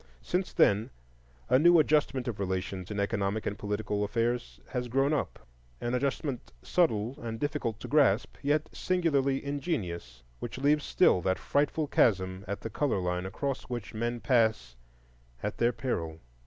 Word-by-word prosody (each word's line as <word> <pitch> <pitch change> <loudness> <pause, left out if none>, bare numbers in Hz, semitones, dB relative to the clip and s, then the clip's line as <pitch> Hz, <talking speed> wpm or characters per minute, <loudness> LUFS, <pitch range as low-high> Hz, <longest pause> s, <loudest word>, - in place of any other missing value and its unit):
Since 180 +1 -1
then 105 +4 +3 0.6
a 130 +1 +5
new 175 +3 +7
adjustment 145 -4 +2
of 115 -5 -3
relations 95 -1 -3
in 105 -1 -3
economic 100 +1 -1
and 100 - -1
political 105 0 -2
affairs 115 - -1
has 125 -1 -2
grown 135 +5 +2
up,—an - - -5
adjustment 135 0 -2
subtle 130 -6 +1
and 115 -1 -5
difficult 145 -7 -2
to - - -6
grasp, 135 -8 +3
yet 150 +2 +1
singularly 145 -7 +1
ingenious, 90 - -3 0.2
which 120 - -6
leaves 145 +2 +2
still 135 - +4
that 95 +2 +1
frightful 150 +2 0
chasm 95 -8 +2
at 100 +1 -4
the 115 - -4
color 145 -1 0
line 90 0 -2
across 135 +7 -3
which 120 -4 -5
men 120 +2 -2
pass 110 - +2 0.7
at - - -3
their 120 +1 +4
peril. 80 -12 -3
115 Hz, 150 wpm, -29 LUFS, 100-140 Hz, 0.7 s, new